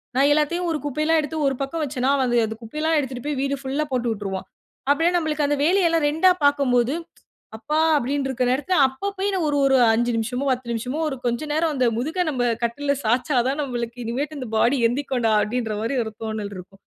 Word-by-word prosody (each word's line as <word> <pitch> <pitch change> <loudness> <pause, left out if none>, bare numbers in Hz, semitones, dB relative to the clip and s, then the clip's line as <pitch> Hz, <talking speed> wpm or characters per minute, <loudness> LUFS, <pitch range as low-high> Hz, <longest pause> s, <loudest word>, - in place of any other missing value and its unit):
நான் 275 +2 +4
எல்லாத்தையும் 340 +4 0
ஒரு 310 - 0
குப்பையெல்லாம் 305 +3 +1
எடுத்து 315 +2 -5
ஒரு 270 - 0
பக்கம் 310 +4 -3
வச்சேன்னா, 265 -1 0
அவன் 250 -2 +1
அந்த 220 - -5
குப்பை 230 +7 -9
எல்லாம் 320 0 +2
எடுத்துட்டுப் 260 -2 -5
போய் 290 -3 -2
வீடு 275 0 0
ஃபுல்லா 275 +3 -2
போட்டுவுட்டுருவான். 210 -6 -2 0.4
அப்பிடியே 325 +5 +3
நம்மளுக்கு 305 -3 0
அந்த 290 - +1
வேலையெல்லாம் 335 -4 +3
ரெண்டா 320 +5 +4
பார்க்கம்போது, 270 -3 +3 0.6
அப்பா! 300 +8 -1 0.2
அப்பிடின்டு 275 0 0
இருக்குற 255 -1 0
நேரத்தில, 310 +7 0
அப்ப 265 +10 -4
போய் 400 +1 0
நான் 355 -4 0
ஒரு, 290 -1 +1
ஒரு. 270 - +4 0.2
"5 240 +1 +1
நிமிஷமோ 245 +4 -2
10 255 -1 -2
நிமிஷமோ 250 +6 -3
ஒரு 270 - -4
கொஞ்சம் 245 +6 -1
நேரம் 315 0 +1
அந்த 255 -2 +2
முதுக 320 +9 -1
நம்ப 255 -5 -1 0.2
கட்டுல்ல 280 +5 0
சாச்சா 250 +4 +1
தான் 275 +3 -1
நம்மளுக்கு 240 -3 -4
இனிமேட்டு 280 +6 -3
இந்த 255 - -5
பாடி 245 +5 +3
எந்திரிக்குன்டா 250 -2 -1
அப்பிடீன்ற 220 -1 -2
மாரி 230 +5 -1
ஒரு 220 - -6
தோணல் 215 -2 -4
இருக்கும். 190 +2 -12
270 Hz, 195 wpm, -23 LUFS, 240-300 Hz, 0.6 s, நான்